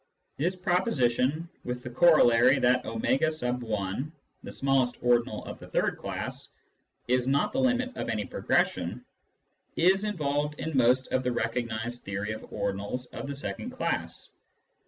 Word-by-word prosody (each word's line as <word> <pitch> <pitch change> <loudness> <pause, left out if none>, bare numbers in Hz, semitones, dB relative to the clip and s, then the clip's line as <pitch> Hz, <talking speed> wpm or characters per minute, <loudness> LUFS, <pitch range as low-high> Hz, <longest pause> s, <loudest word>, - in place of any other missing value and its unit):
This 175 +6 0
proposition, 160 - +1 0.2
with 125 0 -4
the 125 - -5
corol 155 0 +6
lary 125 +4 +5
that 125 0 +3
a*! 125 -3 -1 0.3
(the - - -7
smallest 135 -3 +1
ordinal 120 -2 +2
of - - -8
the - - -11
third - - 0
class) - - -5 0.6
is 125 0 +2
not 140 - +2
the 265 - 0
limit 255 -1 +1
of - - -4
any 105 -1 -1
progression, - - 0 0.7
is 190 +4 +4
involved 150 -7 -1
in 160 -2 -3
most 125 +1 +3
of 130 - +2
the 125 -1 -1
recognised 115 0 -2
theory 100 +2 -3
of 110 - -5
ordinals 100 +6 -3
of - - -5
the 140 - -4
second 165 - -5
class. 255 +1 -3
125 Hz, 145 wpm, -28 LUFS, 120-155 Hz, 0.7 s, corol